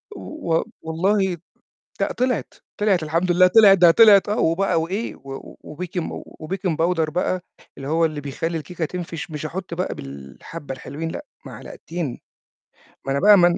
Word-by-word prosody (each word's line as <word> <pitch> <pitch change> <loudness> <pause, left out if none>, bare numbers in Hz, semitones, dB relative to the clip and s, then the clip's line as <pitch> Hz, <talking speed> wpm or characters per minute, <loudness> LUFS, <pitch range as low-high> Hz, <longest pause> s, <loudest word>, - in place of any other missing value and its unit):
و 300 - -3
و - - +2 0.2
والله 185 +3 +1 0.6
لأ - - +1
طلعِت، 250 -2 -1 0.3
طلعِت 195 -6 +2
الحمد 170 +4 0
لله، 185 +1 +6
طلعِت 200 -1 +7
ده 175 -1 +7
طلعِت 205 -1 +7
آه 210 - 0
وبقى 165 0 +2
وإيه 195 +8 -3
و 135 0 -10
وBakin 175 +3 -5 0.4
وBaking 185 0 -2
powder 165 -2 +2
بقى 180 +1 0 0.4
اللي 135 - -6
هو 165 +2 +2
اللي 155 -2 -3
بيخلّي 165 +4 -3
الكيكة 165 +2 -4
تنفش، 170 -1 -6
مش 150 0 -5
أحُط 180 +2 -5
بقى 180 +2 -2
بالحبّة 70 - -8
الحلوين 145 +5 -6
لأ 295 - -6 0.2
معلقتين. 170 - -6 0.9
ما 135 - -2
أنا 140 - +1
بقى 205 0 +7
ما 175 -1 +6
أنا 175 - +1
170 Hz, 165 wpm, -22 LUFS, 155-190 Hz, 0.9 s, طلعِت